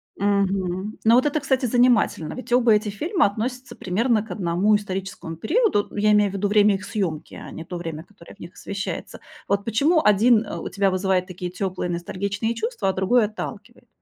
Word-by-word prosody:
Мгм. 195 0 -1
Ну, 225 +1 +5
вот 255 - +4
это, 300 +1 0
кстати, 265 -2 0
занимательно. 240 -9 +2
Ведь 255 -1 -9
оба 240 -2 +5
эти 210 0 +1
фильма 320 - 0
относятся 245 +5 -5
примерно 215 +4 0
к 220 - -11
одному 180 +3 +1
историческому 190 -4 -4
периоду. 270 - +1
Ну, - - -11
я 210 +1 +3
имею 210 -2 +3
в - - -12
виду 200 +1 -1
время 205 0 +4
их 195 - -6
съёмки, 175 -8 -3
а - - -9
не 165 - -8
то 180 - -6
время, 165 -2 -6
которое 190 -3 -16
в - - -24
них 170 - -10
освещается. 200 0 -6 0.3
Вот 200 0 0
почему 285 - +2
один, 220 +2 +4
э, - - -6
у - - -5
тебя 195 0 +1
вызывает 185 0 0
такие 180 -1 -6
тёплые, 185 -1 -3
ностальгичные 200 +6 -3
чувства, 225 -3 -2
а - - 0
другой 210 +5 +2
отталкивает? 215 +1 -8
205 Hz, 195 wpm, -23 LUFS, 185-230 Hz, 0.3 s, Ну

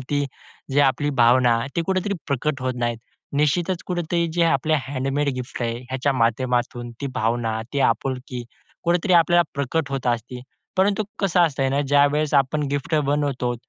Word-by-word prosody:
ती 145 -1 +1 0.5
जे 145 - +4
आपली 145 +1 +2
भावना, 120 -1 +4 0.2
ती 170 - +2
कुठेतरी 190 +1 0
प्रकट 140 0 -1
होत 130 -1 -1
नाहीत. 120 -1 -1 0.4
निश्चितच 165 +5 +1
कुठेतरी 175 -1 -1
जे 170 0 +1
आपले 155 0 +2
हँडमेड 140 +1 -1
गिफ्ट 125 -1 -5
आहे. 115 0 -2
ह्याच्या 130 +2 0
माध्यमातून 120 0 0
ती 140 - -2
भावना, 115 -1 0
ती 140 - 0
आपुलकी, 125 0 -5 0.4
कुठेतरी 175 +2 +2
आपल्याला 175 +1 +5
प्रकट 140 +2 -1
होत 135 -2 -3
असते. 120 +1 -2 0.4
परंतु 200 +2 +2 0.2
कसं 190 -2 +2
असतं 145 -5 +2
आहे 135 - +1
ना? 140 - +1
ज्यावेळेस 145 +1 +3
आपण 150 +3 -2
गिफ्ट 145 +3 -2
बनवतो, 140 -4 0
140 Hz, 160 wpm, -23 LUFS, 125-160 Hz, 0.5 s, आपल्याला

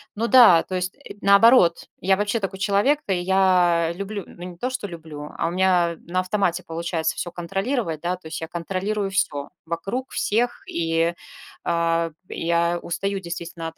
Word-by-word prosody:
Ну 225 +3 -1
да, 235 -10 +7
то 185 - -5
есть, 185 0 -2
э, 285 - -11
наоборот, 200 -3 +5
я 190 +1 +3
вообще 205 +3 0
такой 195 -2 -4
человек 205 +10 +2
то, 195 - 0
я 180 -2 +3
люблю, 200 +2 -5
ну, 175 - -12
не 180 -1 -8
то, 250 +8 -2
что 255 -5 -4
люблю, 155 -4 -9
а - - 0
у - - -2
меня 180 -2 +2
на 185 +2 0
автомате 185 -2 0
получается 165 -1 -2
всё 175 - -4
контролировать, 195 - -2
да, 175 +1 -1
то 180 -3 -13
есть 160 - -6
я 160 - -4
контролирую 195 +4 -3
всё 145 -7 -1 0.2
вокруг, 195 +11 -4
всех, 240 +3 0
и, 165 0 0 0.5
а, 170 0 +1 0.2
я 170 +1 0
устаю 195 +3 -2
действительно 170 -2 -6
от 165 - -9
180 Hz, 175 wpm, -23 LUFS, 170-200 Hz, 0.5 s, да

